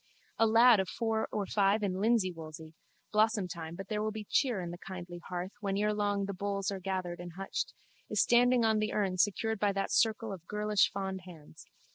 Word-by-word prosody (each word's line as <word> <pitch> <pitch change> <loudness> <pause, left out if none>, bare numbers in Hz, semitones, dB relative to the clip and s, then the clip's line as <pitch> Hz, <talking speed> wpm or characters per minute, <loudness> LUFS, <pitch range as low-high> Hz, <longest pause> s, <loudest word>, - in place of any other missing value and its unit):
A 225 - +5
lad 230 0 +7
of 190 - -1
four 225 -1 -1
or 205 -2 -1
five 200 +2 +2
in 195 -2 0
linseywoolsey 175 -7 -1 0.4
(blossomtime 190 -7 0
but 195 - -7
there 210 0 -2
will 215 - 0
be 215 -1 -6
cheer 245 -7 +1
in 175 -2 -4
the 175 - -8
kindly 175 -1 -8
hearth 180 +1 -4
when 195 -2 -2
ere 210 +1 +1
long 205 -1 0
the 200 - -4
bowls 200 +1 -2
are 195 - -4
gathered 185 -2 -3
and 175 -1 -8
hutched) 195 +2 -4 0.3
is - - 0
standing 245 0 +4
on 220 -1 +3
the 215 0 -1
urn 190 -3 0
secured 215 +2 +1
by 205 0 +2
that 195 0 -2
circle 220 -2 +2
of 170 -3 -10
girlish 210 0 +2
fond 190 -1 -4
hands. 160 -5 -13
200 Hz, 200 wpm, -31 LUFS, 185-215 Hz, 0.4 s, lad